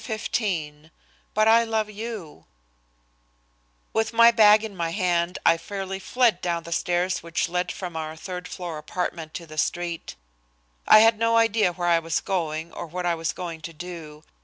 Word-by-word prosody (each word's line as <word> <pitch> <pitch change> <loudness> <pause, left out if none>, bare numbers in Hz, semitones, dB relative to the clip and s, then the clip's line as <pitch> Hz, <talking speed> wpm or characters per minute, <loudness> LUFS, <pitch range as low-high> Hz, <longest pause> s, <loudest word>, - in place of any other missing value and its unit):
XV 170 - -3 0.5
"BUT 215 +1 +4
I 230 +1 +6
LOVE 220 -2 -1
YOU" 210 - -7 1.5
With 220 0 0
my 230 +1 +7
bag 215 -2 +6
in 215 -3 -6
my 170 -2 -2
hand, 175 -1 0
I 165 - +5
fairly 195 +1 -5
fled 225 0 +2
down 170 -1 -1
the 170 - -10
stairs 175 +2 0
which 170 +1 -1
led 180 +1 -1
from 180 -3 -6
our 160 0 -4
third 180 +1 -7
floor 170 -2 -6
apartment 165 0 -4
to 170 - -6
the 155 -1 -6
street. 175 0 -2 0.7
I 215 - +9
had 225 -1 +4
no 230 0 +3
idea 220 -5 +3
where 175 0 -3
I 170 -1 +4
was 165 0 -1
going 165 -3 -3
or 175 - -6
what 180 +2 -5
I 175 - +2
was 165 -1 -2
going 170 -3 -6
to 165 +2 -8
do. 160 -2 -9
180 Hz, 175 wpm, -25 LUFS, 165-215 Hz, 1.5 s, I